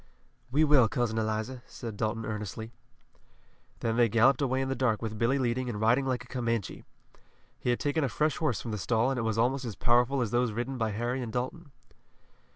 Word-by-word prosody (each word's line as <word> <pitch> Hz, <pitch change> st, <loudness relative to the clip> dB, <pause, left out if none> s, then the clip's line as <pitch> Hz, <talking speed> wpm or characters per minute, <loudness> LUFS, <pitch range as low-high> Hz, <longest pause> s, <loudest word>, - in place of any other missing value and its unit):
"We 145 Hz, +5 st, +3 dB
will, 145 Hz, -6 st, +6 dB
Cousin 120 Hz, -4 st, -1 dB
Eliza," 110 Hz, +3 st, -2 dB
said 115 Hz, -4 st, -7 dB
Dalton 110 Hz, +2 st, -2 dB
earnestly. 110 Hz, +1 st, -5 dB, 1.1 s
Then 115 Hz, -1 st, 0 dB
they 120 Hz, -1 st, +4 dB
galloped 120 Hz, +5 st, +4 dB
away 130 Hz, -1 st, +1 dB
in 135 Hz, -, -1 dB
the 135 Hz, -, 0 dB
dark 120 Hz, -5 st, +1 dB
with 110 Hz, -2 st, -5 dB
Billy 120 Hz, +4 st, +2 dB
leading 125 Hz, -1 st, 0 dB
and 105 Hz, -3 st, -4 dB
riding 120 Hz, +5 st, +3 dB
like 125 Hz, -2 st, -1 dB
a -, -, -17 dB
Comanche. 115 Hz, -6 st, -2 dB, 0.8 s
He -, -, -2 dB
had 120 Hz, -, +2 dB
taken 145 Hz, +2 st, 0 dB
a 135 Hz, -, +1 dB
fresh 150 Hz, +6 st, 0 dB
horse 150 Hz, -7 st, 0 dB
from 115 Hz, -, -5 dB
the 105 Hz, -, -3 dB
stall 115 Hz, +5 st, +1 dB
and 130 Hz, -, -1 dB
it -, -, 0 dB
was 110 Hz, -1 st, -1 dB
almost 130 Hz, +4 st, +1 dB
as 115 Hz, -5 st, -5 dB
powerful 120 Hz, +6 st, +3 dB
as 110 Hz, -, -4 dB
those 120 Hz, -2 st, +1 dB
ridden 125 Hz, +3 st, -3 dB
by 110 Hz, -1 st, +1 dB
Harry 120 Hz, +5 st, -2 dB
and 120 Hz, -2 st, -4 dB
Dalton. 140 Hz, +6 st, -4 dB
120 Hz, 210 wpm, -29 LUFS, 110-130 Hz, 1.1 s, will